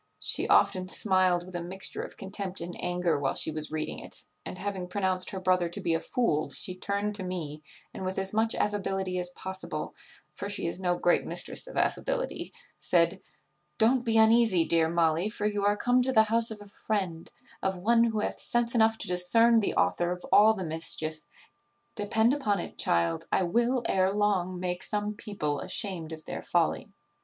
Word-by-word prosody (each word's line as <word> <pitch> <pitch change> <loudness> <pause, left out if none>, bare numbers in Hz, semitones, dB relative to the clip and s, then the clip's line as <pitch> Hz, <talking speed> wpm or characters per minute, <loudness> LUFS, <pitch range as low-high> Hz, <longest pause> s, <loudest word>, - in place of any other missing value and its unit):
She - - 0
often 185 -1 +3
smiled 185 -2 +2
with 185 0 -10
a 175 - -2
mixture 185 +3 -4
of - - -9
contempt 195 -1 -5
and 175 +1 -6
anger 175 -4 0
while 135 -1 -1
she - - -1
was 155 0 -3
reading 155 -1 -3
it; - - -9 0.2
and, - - -7
having 190 -2 -4
pronounced 185 -1 0
her 190 - -5
brother 185 -2 +2
to 170 - -5
be 165 - 0
a 165 - +1
fool, 165 -8 0
she 185 - -6
turned 200 +3 -2
to 205 -2 -5
me, 160 -5 -5 0.3
and, - - -6
with 185 0 -3
as 195 +1 0
much 220 +1 +2
affability 195 -3 -1
as 180 0 -2
possible 190 +1 -6 0.4
(for 200 - -6
she 205 - -2
is 170 +2 -3
no 180 -2 0
great 175 - +2
mistress - - -2
of - - -8
affability), - - -1 0.3
said, - - +2 0.6
'Don't 240 +3 +3
be 225 -2 +2
uneasy, 220 -6 +5
dear 165 -1 +2
Molly, 170 +3 +1
for 210 -1 -4
you 205 -1 0
are 205 +1 +2
come 245 +2 +3
to 260 +1 +1
the 220 -3 +6
house 230 +1 +2
of 215 -2 -6
a - - -10
friend 195 -5 -3 0.3
of 190 -1 -1
one 230 +5 +3
who 220 -2 -1
hath - - -3
sense 240 -1 0
enough 225 -1 +3
to - - -4
discern 225 +7 +4
the 210 - -1
author 90 - +1
of 180 0 -5
all 220 +2 +6
the 190 -3 -4
mischief: 155 -1 -3 0.7
depend 220 +3 +2
upon 215 -9 0
it, - - -6
child, 85 -1 +1
I - - +2
will, 235 +7 +1
ere 190 0 +2
long, 195 -3 0
make 180 0 -3
some 210 0 -1
people 170 -9 -3
ashamed 185 -4 -2
of 155 -1 -8
their - - -5
folly. 175 +4 0
190 Hz, 195 wpm, -28 LUFS, 175-215 Hz, 0.7 s, the